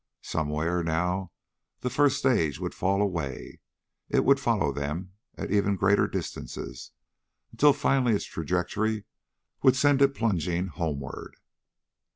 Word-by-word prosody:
Somewhere, 80 +3 -1
now, 90 +3 -1 0.5
the 125 - -2
first 145 -2 +3
stage 80 - +1
would - - -4
fall 100 +2 +1
away. 85 -10 -4 0.5
It - - +2
would 140 0 +5
follow 115 - +1
them, 75 +7 -4 0.2
at - - -5
ever 100 0 +2
greater 95 +2 +3
distances, - - -6 0.6
until 145 0 +5
finally 135 -4 +2
its - - -2
trajectory 110 -1 -1 0.6
would 130 -1 +5
send 140 0 +3
it 140 0 +4
plunging 90 -5 0
homeward. 70 -5 -5
95 Hz, 125 wpm, -27 LUFS, 80-125 Hz, 0.6 s, would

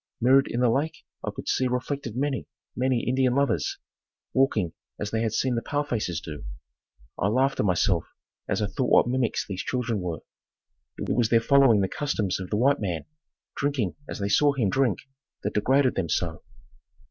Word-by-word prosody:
Mirrored 135 +3 +5
in 120 - -2
the 125 - +4
lake 145 +6 -2 0.2
I - - -2
could - - -8
see 130 - +2
reflected 125 -1 -3
many, 140 0 -1 0.3
many 125 -1 0
Indian 130 0 +2
lovers 140 -5 +1 0.6
walking 110 -10 +2 0.3
as 105 - -3
they 110 - 0
had 115 -1 0
seen 130 +3 0
the 115 - 0
pale 145 +5 -1
faces 105 - -2
do. 75 -5 -8 0.8
I 95 - +2
laughed 130 +6 +2
to - - +1
myself 90 -3 +2 0.4
as - - 0
I - - +2
thought 125 +5 -1
what - - +5
mimics 125 -1 0
these 95 -2 -4
children 120 -4 -1
were. 85 -3 -4 0.8
It - - -2
was 120 -2 +2
their 115 - +5
following 125 -3 +5
the 95 - +1
customs 105 -8 -1
of 90 -1 -6
the 105 - 0
white 135 +4 +3
man, 90 -6 -2 0.5
drinking 140 -9 0 0.2
as - - -4
they 100 - -2
saw 145 +6 +4
him 115 -9 0
drink, 125 -8 +2 0.5
that - - -2
degraded 130 +5 +3
them 90 -4 -2
so. 80 0 -1
120 Hz, 185 wpm, -26 LUFS, 100-135 Hz, 0.8 s, Mirrored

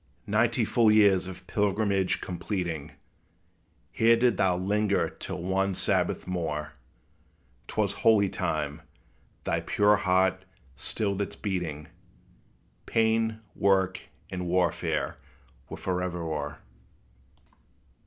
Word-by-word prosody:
Ninety - - +2
full 115 -2 +3
years 100 -4 +5
of 95 0 -9
pilgrimage 100 -1 +1
completing, 85 -4 -4 1.0
Here 115 +1 +4
didst 120 -4 +2
thou 90 -2 +2
linger 100 +2 +1
till 90 -2 -6
one 95 +1 0
Sabbath - - 0
more: 80 -5 -3 0.9
'T - - -9
was - - +2
holy 105 -3 +4
time; 75 -5 -2 0.6
thy - - 0
pure 105 0 +3
heart 95 +1 +2 0.3
stilled 100 - -2
its 100 - -3
beating; 85 -7 -3 1.0
Pain, 110 0 +1
work, 95 -1 +2 0.3
and 90 -1 -3
warfare 90 +1 0 0.5
were - - -6
forever 90 -2 -2
o'er! 75 -2 -4
95 Hz, 105 wpm, -28 LUFS, 90-105 Hz, 1.0 s, years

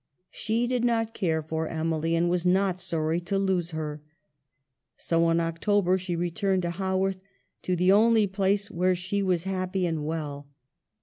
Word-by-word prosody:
She 225 +2 -1
did 245 -1 -1
not 225 -2 +1
care 160 -6 -1
for 160 +1 -3
Emily, 160 0 -1
and 170 +1 +2
was 175 0 0
not 185 0 +2
sorry 165 -2 -1
to 175 +3 -2
lose 190 -3 0
her. 155 -2 -5 1.0
So 165 0 +1
in 165 0 +2
October 180 +3 +1
she 180 -1 -3
returned 185 +2 0
to 170 - -1
Haworth, 190 +1 -1 0.4
to 180 - -1
the 180 +2 +3
only 220 +1 +5
place 200 +1 0
where 185 +2 +1
she 190 +3 -2
was 180 -3 +1
happy 185 0 -2
and 160 -3 -2
well. 150 -2 -4
180 Hz, 165 wpm, -27 LUFS, 165-195 Hz, 1.0 s, only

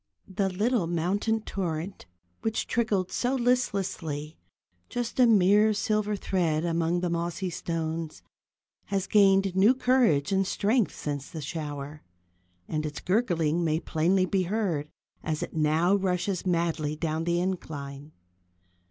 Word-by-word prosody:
The 195 0 -1
little 205 0 0
mountain 195 +7 0
torrent 185 -2 -4 0.3
which 220 0 -1
trickled 210 -6 0
so 255 +2 0
listlessly, 195 - -1 0.5
just 245 +1 -3
a 250 - +7
mere 210 0 +5
silver 210 0 0
thread 170 -5 0
among 165 0 +1
its 180 - +1
mossy 170 +2 -2
stones, 160 - -4 0.6
has 195 -1 -1
gained 195 -2 +4
new 205 +7 +5
courage 245 - +2
and 195 -1 +2
strength 215 +2 +1
since 145 -1 -4
the 165 - -7
shower, 150 -1 -5 0.7
and 155 -1 -2
its 150 -1 -4
gurgling 175 -5 +1
may 160 -1 +1
plainly 180 +4 +1
be 190 +1 0
heard 180 -6 -1 0.3
as 155 -1 -2
it - - -7
now 160 +4 +2
rushes 190 -1 0
madly 165 -3 0
down 160 +1 -2
the 170 0 +1
incline. 150 -6 -4
180 Hz, 130 wpm, -27 LUFS, 160-200 Hz, 0.7 s, a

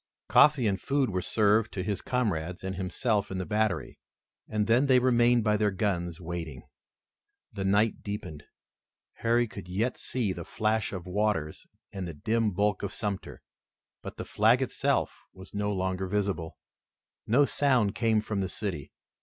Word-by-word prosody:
Coffee 150 -5 +6
and 100 -2 0
food 135 -4 +1
were 90 -1 -1
served 105 +2 +2
to 90 - -3
his 100 +1 -2
comrades 90 -10 -2
and 95 0 -3
himself 100 +3 -1
in 95 - -4
the 95 - -3
battery, 105 -4 -1 0.5
and 105 -1 0
then 120 +6 +3
they 130 -1 +6
remained 120 -1 +4
by 105 -1 +2
their 105 0 +2
guns 90 -4 -2
waiting. 80 -6 -6 0.9
The 95 - -3
night 105 +3 +2
deepened. 80 -8 -6 0.7
Harry 120 +1 +2
could 100 -3 -9
yet 105 +8 -1
see 115 -7 -1
the - - -6
flash 110 0 -1
of 90 -4 -6
waters 95 -5 -1 0.3
and 95 -2 -4
the 85 - -7
dim 110 +7 +1
bulk 100 +1 0
of 100 - -4
Sumter, 100 -2 -4 0.6
but - - -8
the - - -5
flag 110 +4 +3
itself 130 - 0 0.2
was 95 +1 -12
no 105 0 -1
longer 95 -1 -2
visible. 95 -4 -2 0.7
No 130 +6 +5
sound 125 -9 +2
came 110 -2 +2
from 105 -2 -2
the 95 - -2
city. 90 -10 -5
105 Hz, 160 wpm, -28 LUFS, 95-115 Hz, 0.9 s, Coffee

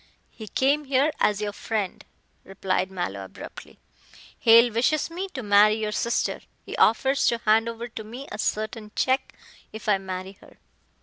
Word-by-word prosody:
"He 220 - -10
came 280 +7 +1
here 275 +3 +2
as 210 0 +2
your 205 -1 -3
friend," 210 -3 -3 0.4
replied 190 -1 -2
Mallow 100 - -4
abruptly, 95 - -11 0.6
"Hale 230 +1 +6
wishes 285 +8 +1
me 365 +3 -4
to 255 - -4
marry 205 +1 +5
your 215 -1 -2
sister. 235 +2 -1 0.2
He - - -6
offers 265 +5 +3
to 235 - +2
hand 225 +2 +4
over 230 +1 -6
to 225 -2 -8
me 245 +6 -9
a - - -6
certain 215 0 -3
check 265 +1 0 0.4
if 220 0 -9
I 205 -2 +3
marry 185 0 -6
her." - - -18
220 Hz, 165 wpm, -25 LUFS, 205-250 Hz, 0.6 s, Hale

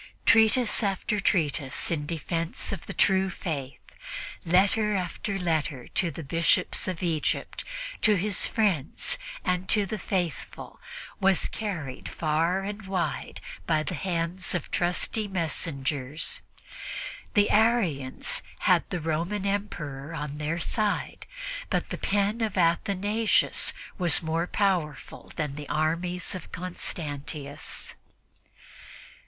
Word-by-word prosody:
Treatise 225 +2 +5
after 205 +1 0
treatise 150 -9 +1
in 150 -3 -1
defense 165 +1 -1
of 195 -4 -5
the - - -4
true 190 0 +4
Faith; 145 -7 -4 0.6
letter 200 +5 +3
after 190 +2 -2
letter 155 -7 -1
to 175 - +2
the 160 +1 -7
Bishops 165 +4 +2
of 185 -1 -3
Egypt, 160 -4 0 0.4
to 215 -2 +5
his 200 +1 +2
friends 200 - +1 0.3
and 180 +1 0
to 210 -2 +5
the 210 +2 -4
faithful 180 - -3 0.4
was 190 -1 +3
carried 170 - -4
far 165 +4 +1
and 205 0 -5
wide 180 -5 -2 0.3
by 155 -2 +3
the 180 - -3
hands 175 +1 -1
of 175 - -3
trusty 180 +4 +1
messengers. 150 -5 -1 0.9
The 205 -1 +5
Arians 200 - +2 0.2
had - - +4
the 175 - -2
Roman 170 +6 -1
Emperor 160 -8 -3
on 150 -1 -4
their 155 +3 -1
side, 210 +5 -1 0.4
but - - 0
the - - -4
pen 205 +3 +1
of 215 -3 -1
Athanasius 200 +5 +3 0.3
was 175 -1 +5
more 165 +2 0
powerful 180 -9 -1
than 150 -3 -2
the 145 0 -7
armies 170 +4 0
of 185 - -7
Constantius. 150 -4 -4
175 Hz, 115 wpm, -28 LUFS, 155-200 Hz, 0.9 s, Treatise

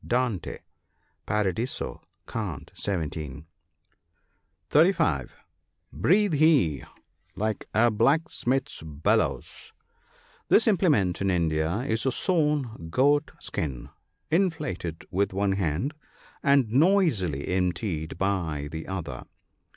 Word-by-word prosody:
Dante, 120 -7 -1 0.7
Paradiso, 105 - -1 0.3
cant. 95 -11 -5
17. 80 -6 -4 1.3
(35 150 - +3 0.3
) - - -36
Breathe 185 - +3
he 145 - +3 0.5
like 110 +1 -2
a 120 +1 +5
blacksmith's 135 +3 0
bellows, 75 -1 -1 0.3
— - - -31
This 220 - +5
implement 150 - +2
in 95 - +1
India 85 +2 0
is 115 -1 -1
a - - +3
sewn 150 - 0
goat 145 - +3
skin, 65 -6 -4 0.4
inflated 150 - -1
with 95 +2 0
one 100 +1 +1
hand 95 - -1 0.5
and 140 -4 +4
noisily 135 - +2
emptied 90 -3 -1
by 85 -7 -1
the 80 0 -6
other. 85 -10 -5
100 Hz, 95 wpm, -26 LUFS, -, 1.3 s, a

